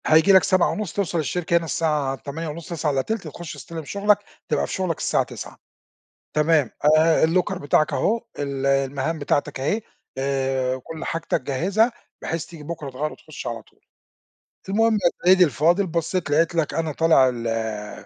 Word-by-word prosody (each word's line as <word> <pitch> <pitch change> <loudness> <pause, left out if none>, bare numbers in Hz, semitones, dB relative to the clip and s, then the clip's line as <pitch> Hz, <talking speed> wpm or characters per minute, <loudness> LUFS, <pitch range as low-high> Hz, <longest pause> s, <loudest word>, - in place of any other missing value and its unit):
هييجي 160 +5 +6
لَك 190 - +7
07:30 190 0 +1
توصَل 180 -4 -1
الشركة 170 +3 0
هنا 170 - -2
الساعة 150 -5 0
08:30 150 +5 -6
08:40 165 +4 -1
تخُش 165 +2 -8
تستلم 165 -3 -8
شُغلَك، 200 +4 +2 0.3
تبقى - - +1
في - - -6
شُغلَك 185 -4 -1
الساعة - - +1
09:00. - - -9 0.8
تمام. 150 -2 +3 0.3
آآ 160 0 +4
الlocker 180 +3 +1
بتاعَك 150 0 +1
أهو 230 +2 +1 0.2
ال 140 -1 -3
المَهام 135 +3 0
بتاعتَك 145 -1 -1
أهي 180 +12 0 0.4
آآ 135 -1 0
وكل 155 +5 -8
حاجتَك 165 -3 -1
جهّزها 185 - +1 0.3
بحيث 165 0 -3
تييجي 165 -3 -11
بُكرة 155 -2 -6
تغيَّر 145 +4 -3
وتخُش 155 - -9
على 115 -1 -4
طول. - - -28 0.9
المُهم 225 +3 +3
يا 180 -5 0
سَيّدي 185 0 +7
الفاضل 170 - +2
بصّيت 170 0 -2
لقيت 165 +3 +2
لَك 165 -3 0
أنا 165 -1 -1
طالع 155 -4 +4
ال 110 -3 -4
160 Hz, 155 wpm, -23 LUFS, 140-175 Hz, 0.9 s, لَك